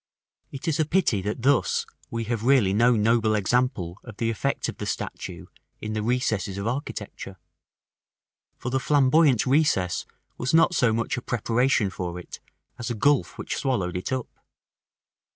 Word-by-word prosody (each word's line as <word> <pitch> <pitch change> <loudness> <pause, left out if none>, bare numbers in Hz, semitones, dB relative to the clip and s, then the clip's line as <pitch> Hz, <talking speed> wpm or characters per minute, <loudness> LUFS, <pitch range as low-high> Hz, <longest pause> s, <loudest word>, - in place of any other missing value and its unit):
§ - - -69 0.5
IX. 135 - -6
It 165 - -8
is 160 -2 0
a 155 - +3
pity 155 - +1
that 105 +4 -4
thus 140 -2 +2 0.2
we 115 0 -3
have 115 -1 -2
no 115 - -3
really 125 -9 +4
noble 115 0 +3
example 105 -4 0
of 110 -4 -11
the 115 -1 0
effect 110 - -1
of - - -6
the - - -5
statue - - -5 0.3
in 110 0 -5
the 110 - -1
recesses 110 -4 -1
of 100 - -4
architecture: 110 -6 -5 1.2
for 125 - -5
the 130 - +1
Flamboyant 140 -2 +4
recess 130 - +1 0.3
was 125 +5 +1
not 165 +2 +5
so 125 -8 +3
much 115 +3 -1
a - - -3
preparation 120 -2 +1
for 90 -1 -5
it 90 - -10 0.4
as 120 - -4
a 120 - -2
gulf 145 +5 +2
which - - -4
swallowed 100 -11 -1
it 90 - -3
up. 130 -2 -2
120 Hz, 170 wpm, -25 LUFS, 105-130 Hz, 1.2 s, not